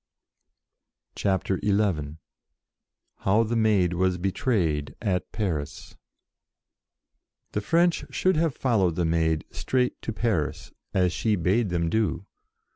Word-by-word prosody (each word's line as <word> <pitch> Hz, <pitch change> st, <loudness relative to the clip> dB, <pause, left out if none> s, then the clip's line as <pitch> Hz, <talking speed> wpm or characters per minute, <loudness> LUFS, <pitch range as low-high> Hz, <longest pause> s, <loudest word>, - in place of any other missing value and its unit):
CHAPTER 95 Hz, -1 st, 0 dB
XI 95 Hz, -8 st, 0 dB, 1.0 s
HOW 105 Hz, +4 st, +2 dB
THE 115 Hz, +1 st, -2 dB
MAID 105 Hz, -6 st, +3 dB
WAS 90 Hz, 0 st, +1 dB
BETRAYED 85 Hz, -, -1 dB
AT 95 Hz, -5 st, -1 dB
PARIS 85 Hz, -10 st, -4 dB, 1.6 s
THE 105 Hz, -, -1 dB
French 170 Hz, +9 st, +2 dB
should 185 Hz, 0 st, +1 dB
have 160 Hz, -3 st, +1 dB
followed 100 Hz, -10 st, +2 dB
the 85 Hz, -, 0 dB
Maid 80 Hz, -1 st, +1 dB
straight 125 Hz, -1 st, -1 dB
to -, -, -3 dB
Paris, 105 Hz, -9 st, -2 dB, 0.2 s
as 90 Hz, -2 st, +2 dB
she 110 Hz, -2 st, +1 dB
bade 95 Hz, +5 st, +1 dB
them 85 Hz, -1 st, 0 dB
do. 100 Hz, -1 st, 0 dB
95 Hz, 115 wpm, -26 LUFS, 85-110 Hz, 1.6 s, MAID